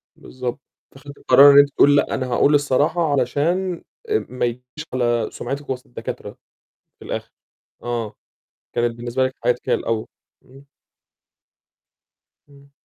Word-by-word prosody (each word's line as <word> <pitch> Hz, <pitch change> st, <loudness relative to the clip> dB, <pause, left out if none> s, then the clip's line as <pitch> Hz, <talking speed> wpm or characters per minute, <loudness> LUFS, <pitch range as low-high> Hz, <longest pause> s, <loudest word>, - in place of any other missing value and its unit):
بالضبط، 125 Hz, +1 st, -6 dB, 0.3 s
فخدتِ 140 Hz, +1 st, -13 dB
القرار 140 Hz, +3 st, +7 dB
إن -, -, +6 dB
أنتِ 145 Hz, 0 st, +5 dB
تقولي 145 Hz, 0 st, +4 dB
لأ، -, -, +1 dB
أنا 130 Hz, -2 st, -3 dB
هأقول 145 Hz, +4 st, +3 dB
الصراحة، 145 Hz, +3 st, +1 dB
علشان 165 Hz, +8 st, 0 dB, 0.5 s
ما 125 Hz, -1 st, -2 dB
ييجيش 120 Hz, +1 st, -4 dB, 0.3 s
على 120 Hz, -3 st, 0 dB
سمعتِك 140 Hz, +1 st, -6 dB
وسط 125 Hz, -1 st, -4 dB
الدكاترة 120 Hz, -, -8 dB, 0.6 s
في -, -, -13 dB
الآخر. -, -, -5 dB, 0.5 s
آه، 120 Hz, -3 st, -4 dB, 0.6 s
كانت 120 Hz, -1 st, 0 dB
بالنسبة 120 Hz, +2 st, -1 dB
لِك 130 Hz, -, -6 dB
حياتِك 125 Hz, +1 st, 0 dB
هي -, -, +3 dB
الأول، 110 Hz, -1 st, -2 dB, 0.4 s
إمم. 135 Hz, +2 st, -18 dB, 1.8 s
إمم. 140 Hz, 0 st, -20 dB
130 Hz, 130 wpm, -21 LUFS, 120-145 Hz, 1.8 s, القرار